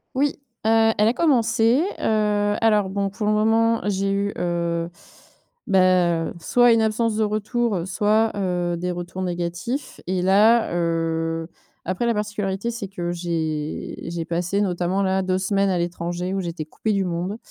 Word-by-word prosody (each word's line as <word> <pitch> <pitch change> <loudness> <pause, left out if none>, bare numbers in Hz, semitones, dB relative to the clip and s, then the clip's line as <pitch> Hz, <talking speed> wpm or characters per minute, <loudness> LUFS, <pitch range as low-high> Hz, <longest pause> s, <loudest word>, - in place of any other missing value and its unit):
Oui, 280 +2 0 0.3
heu, 225 0 +4
elle 210 - +4
a 230 - +3
commencé, 240 -2 +3 0.2
heu, 210 -1 +1
alors, 210 -3 +3
bon, 200 0 -1
pour 210 +1 -3
le 210 - +3
moment, 225 +2 +2
j'ai 195 -1 0
eu, 200 +1 -1
heu, 170 -1 -1 0.8
beh, 195 - +3 0.5
heu, - - -8
soit 245 +7 +4
une 225 - +3
absence 220 0 +1
de 220 - +1
retour, 215 -2 -1
soit, 215 +3 +2
heu, 180 -3 -1
des 180 +2 -3
retours 175 +1 -6
négatifs 175 - -4
et 185 0 0
là, 210 +2 +4
heu, 165 -1 -1 0.4
après, 185 +7 -1
la 235 - +2
particularité, 210 0 -2
c'est 225 -4 -5
que 175 -2 -4
j'ai 160 -3 -3
j'ai 165 -1 -4
passé, 180 +4 -1
notamment, 180 0 0
là, 190 0 +1
2 185 0 0
semaines 195 +1 +1
à 185 - +1
l'étranger 175 +1 -3
où 195 - -1
j'étais 170 -3 -5
coupée 215 +7 -2
du 195 -1 0
monde, 180 +4 -3
195 Hz, 165 wpm, -23 LUFS, 175-220 Hz, 0.8 s, heu